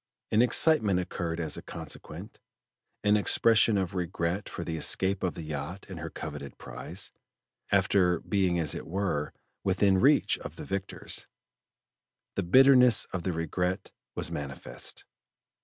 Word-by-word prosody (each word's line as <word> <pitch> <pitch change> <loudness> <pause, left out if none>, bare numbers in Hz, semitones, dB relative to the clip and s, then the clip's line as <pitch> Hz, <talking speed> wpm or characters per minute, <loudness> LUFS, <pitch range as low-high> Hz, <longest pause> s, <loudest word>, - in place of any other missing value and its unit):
An 110 - +5
excitement 120 - +3
occurred 85 -2 -3
as 80 -3 -2
a - - -6
consequent; - - -9 0.6
an 105 0 +4
expression 110 +1 +4
of 95 -1 -1
regret 90 +1 -2
for - - -5
the 80 -1 -3
escape 95 +5 +1
of 90 - -1
the 80 - -6
yacht 75 +5 -5
and 95 -4 -7
her 80 0 -5
coveted 75 -3 -7
prize, - - -6 0.6
after 90 -4 +3
being 95 -4 +1
as 80 -4 +2
it - - -6
were 85 -5 -1 0.3
within 95 0 +3
reach 140 +7 +4
of - - -8
the - - -8
victors. 100 0 -4 1.1
The - - -1
bitterness 125 +4 +6
of 95 - -2
the 90 - -1
regret 90 +3 -2 0.2
was - - -1
manifest. 70 -1 -5
90 Hz, 140 wpm, -29 LUFS, 80-100 Hz, 1.1 s, bitterness